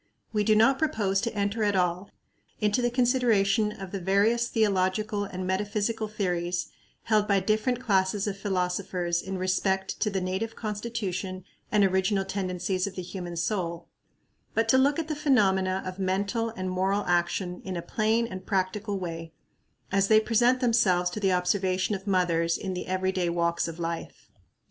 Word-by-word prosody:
We 210 -1 +2
do 215 +1 +4
not 230 +5 +4
propose 200 -10 +1
to 235 -2 -3
enter 205 +2 0
at 205 -1 +2
all 180 +1 0 0.5
into 210 +2 +1
the 240 - +2
consideration 230 -4 +2
of 195 -3 -8
the 195 - -3
various 205 +6 +2
theological 205 -1 +1
and 185 -1 -5
metaphysical 210 +3 -1
theories 180 -4 -2 0.3
held 215 -2 +2
by 200 -1 +3
different 215 +5 0
classes 195 -4 +1
of 205 -2 -2
philosophers 180 -2 -1
in 190 0 -5
respect 190 +1 0
to 215 - +1
the 195 -2 -1
native 190 +5 -3
constitution 205 -4 -4 0.3
and 210 -2 +4
original 190 +1 +2
tendencies 185 -1 -2
of 195 - -7
the 185 - -4
human 175 -1 -6
soul, 170 -1 -2 0.7
but 225 0 +2
to 260 - +6
look 280 +2 +3
at 325 -2 -2
the 310 - -2
phenomena 190 -10 +2
of 185 +1 -6
mental 200 +5 0
and 185 -5 -4
moral 190 +2 0
action 175 +1 0
in 185 -2 -4
a 170 - -4
plain 220 +2 +1
and 185 -4 -8
practical 200 +1 -1
way, 165 -3 -6 0.6
as 195 0 +2
they 215 +1 +6
present 240 +3 +2
themselves 185 -7 +3
to 210 - -4
the 195 -2 +2
observation 185 +2 +1
of 195 0 -5
mothers 170 -3 +2
in 190 -1 -4
the 180 - -5
every 185 0 0
day 180 -2 0
walks 170 0 0
of 165 0 -6
life. 170 -1 -5
195 Hz, 170 wpm, -27 LUFS, 185-215 Hz, 0.7 s, to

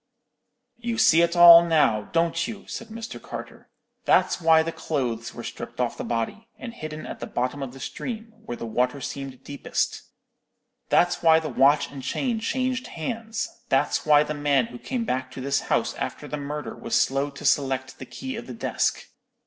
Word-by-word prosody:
"'You 235 -1 -3
see 165 -6 +6
it 170 0 +2
all 170 -1 +10
now, 150 -11 +2
don't 165 0 +1
you?' 220 -3 -8
said 230 - -7
Mr. 225 +1 -8
Carter; - - -9 0.4
'that's - - +3
why 160 -1 +5
the 165 - -3
clothes 120 -9 -3
were - - -7
stripped - - -8
off - - 0
the - - -5
body, 120 - -3
and 235 -2 -7
hidden 155 -7 -7
at - - -7
the - - -5
bottom 130 +3 -2
of 135 -2 -4
the 135 - -12
stream, 225 - -6
where 120 - -6
the - - -6
water 125 +4 0
seemed 135 -1 -6
deepest; 140 -1 -2 0.9
that's 175 0 +3
why 160 -1 +6
the 160 - -5
watch 140 +1 +3
and 140 -1 -8
chain 235 - -1
changed 255 +2 -1
hands; 225 +6 -5
that's 135 - +2
why 150 -1 +5
the 150 - -4
man 145 -3 +2
who 120 +1 -10
came 245 -3 -3
back 130 - -2
to 130 - -9
this 140 +2 0
house - - +1
after - - -5
the - - -4
murder 150 +1 -5
was 115 - -3
slow 135 +4 +1
to 140 - -10
select 130 -2 +1
the - - -7
key 265 -1 -6
of 235 +2 -7
the - - -7
desk. 225 - -1
155 Hz, 190 wpm, -25 LUFS, 135-220 Hz, 0.9 s, all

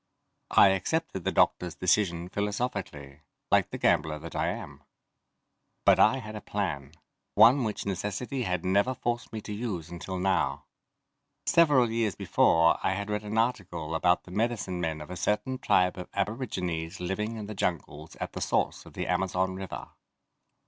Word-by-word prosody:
I - - +7
accepted 95 - -1
the - - +1
doctors' 90 -2 +2
decision 90 -2 +1
philosophically, 100 - -4 0.3
like - - +4
the - - -5
gambler 75 -1 +2
that 80 +2 -9
I - - 0
am. - - -5 1.0
But - - +6
I 120 +5 +5
had 110 -4 -7
a 105 - -6
plan: 80 -9 -3 0.4
One 130 +3 +7
which 110 -2 -3
necessity 105 +7 -3
had 90 -6 -2
never 100 +7 +2
forced 120 0 -3
me 110 - -5
to 105 - -6
use 100 -7 -4
until 90 +2 -5
now. 95 +1 0 0.8
Several 145 -8 +4
years 115 -4 0
before 85 0 +3
I 95 - +1
had 100 +2 -4
read 105 0 -1
an 105 +1 -4
article 95 -9 -1
about 90 +2 +2
the 90 - -13
medicine 105 -4 -1
men 80 -2 -2
of 75 - -9
a - - -5
certain 105 +8 -1
tribe 90 -6 +2
of 90 - -7
aborigines 95 -5 -3
living 105 +5 -2
in 105 - -5
the 105 - -6
jungles 80 -5 -3
at - - -6
the - - -5
source - - 0
of - - -14
the - - -3
Amazon 95 0 0
River. 95 -1 -7
95 Hz, 165 wpm, -28 LUFS, 90-110 Hz, 1.0 s, I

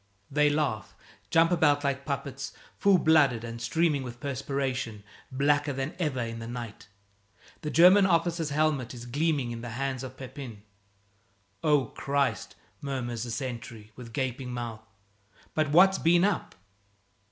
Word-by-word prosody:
They 150 +1 +4
laugh, 145 -9 -1 0.3
jump 165 +1 +4
about 150 -4 +3
like 140 -1 -1
puppets, 140 -1 -4 0.2
full 200 -2 +4
blooded 145 -8 +4
and 115 0 -6
streaming 150 +4 +1
with 120 -2 -8
perspiration, 130 -5 -3 0.3
blacker 145 +2 +2
than 135 +2 -3
ever 150 -7 -1
in 115 -1 -4
the 115 - -7
night. 120 -4 -7 0.7
The 150 - -3
German 185 +5 +7
officer's 170 -2 +1
helmet 145 -4 0
is 120 0 -9
gleaming 140 -1 0
in 115 0 -6
the 120 - -6
hands 135 -1 -2
of 130 0 -8
Pepin. 130 -5 -9 1.0
"Oh, 150 -3 +3
Christ!" 140 +4 -1 0.3
murmurs 125 -4 -3
the - - -6
sentry, 115 -4 -6
with 120 -2 -10
gaping 130 0 -3
mouth, 120 -3 -5 0.7
"but 155 -1 +1
what's 190 +5 +6
been 175 +2 +4
up?" 200 -3 0
135 Hz, 140 wpm, -28 LUFS, 120-155 Hz, 1.0 s, German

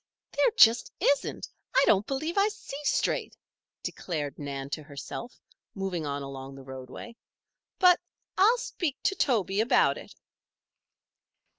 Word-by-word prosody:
"There - - +3
just 230 +1 +6
isn't! 285 - +1 0.3
I 265 - +6
don't 205 +1 +3
believe 310 +5 -2
I 400 +1 +4
see 355 -9 -7
straight!" - - 0 0.5
declared 150 -6 -4
Nan 140 -1 -5
to 155 - -3
herself, 145 - -8 0.4
moving 185 -5 -3
on 140 0 -3
along 135 0 -8
the 135 - -11
roadway. 130 - -9 0.6
"But 360 -2 +6 0.4
I'll 435 +6 +5
speak 330 - -3
to 415 - +2
Toby 210 - +1
about 230 - +3
it." - - -13
200 Hz, 130 wpm, -28 LUFS, -, 0.6 s, just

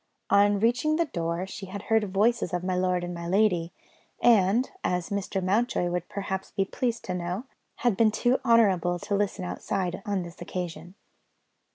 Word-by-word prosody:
On 205 0 +5
reaching 245 +8 +2
the 335 +1 +2
door, 170 - -2
she 195 0 -8
had 200 +2 -7
heard 220 0 +3
the 210 - -3
voices 200 -1 +1
of 175 - -3
my 185 0 -1
lord 180 -1 +1
and 175 0 -4
my 170 0 -6
lady, 180 -3 +2 0.5
and 225 +1 +4 0.2
(as 180 +2 -1
Mr. 195 -1 -2
Mountjoy 195 -2 +1
would 175 -1 -3
perhaps 190 -1 -4
be 195 -1 -1
pleased 235 +3 -2
to 185 - -3
know) 180 +4 -3 0.4
had 240 -5 +4
been 220 +2 +4
too 245 +4 +1
honourable 195 -8 +3
to 205 - -5
listen 200 -2 -1
outside, 180 0 -3
on 200 -3 -1
this 170 -1 -11
occasion. 180 0 -6
195 Hz, 180 wpm, -27 LUFS, 180-220 Hz, 0.5 s, On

